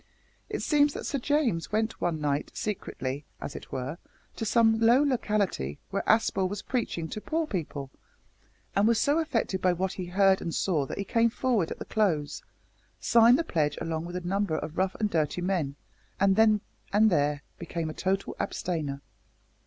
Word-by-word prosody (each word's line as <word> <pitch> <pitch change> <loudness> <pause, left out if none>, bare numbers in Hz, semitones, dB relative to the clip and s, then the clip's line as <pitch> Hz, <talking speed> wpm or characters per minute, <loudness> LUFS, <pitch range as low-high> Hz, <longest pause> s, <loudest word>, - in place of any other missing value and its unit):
It - - -3
seems 290 -1 +3
that - - -5
Sir 280 - -1
James 255 - 0
went 220 +1 -1
one 165 -3 0
night, 145 -1 -1
secretly, 145 -9 -4 0.2
as - - -6
it - - -9
were, 135 +6 -4 0.4
to 225 - -3
some 225 0 +4
low 235 +5 +5
locality 210 - 0
where 195 - 0
Aspel 195 -4 +3
was 205 0 -5
preaching 225 -10 -2
to 215 - -5
poor 325 +5 -1
people, 145 - -4 0.8
and 200 +2 +4
was 230 -1 +3
so 290 +6 +3
affected 235 - -1
by 185 -1 +3
what 185 +2 -1
he 185 -2 -5
heard 190 +1 +3
and 165 - -3
saw 155 -8 +1
that - - -6
he 200 - -1
came 230 +3 +2
forward 230 -7 0
at - - -5
the - - -7
close, 170 -9 0 0.6
signed 235 +2 +6
the 335 - 0
pledge 155 - 0
along 165 0 -3
with 175 +1 -7
a 180 - -2
number 190 -2 0
of 155 +1 -5
rough 190 0 0
and 210 -2 -1
dirty 155 +1 0
men, 175 -7 -1 0.4
and 195 0 +4
then 215 -1 +4 0.3
and 215 +1 +5
there 145 -2 +1 0.2
became 170 -1 -3
a 155 - -4
total 195 +3 -1
abstainer. 150 -6 -2
190 Hz, 185 wpm, -28 LUFS, 160-225 Hz, 0.8 s, signed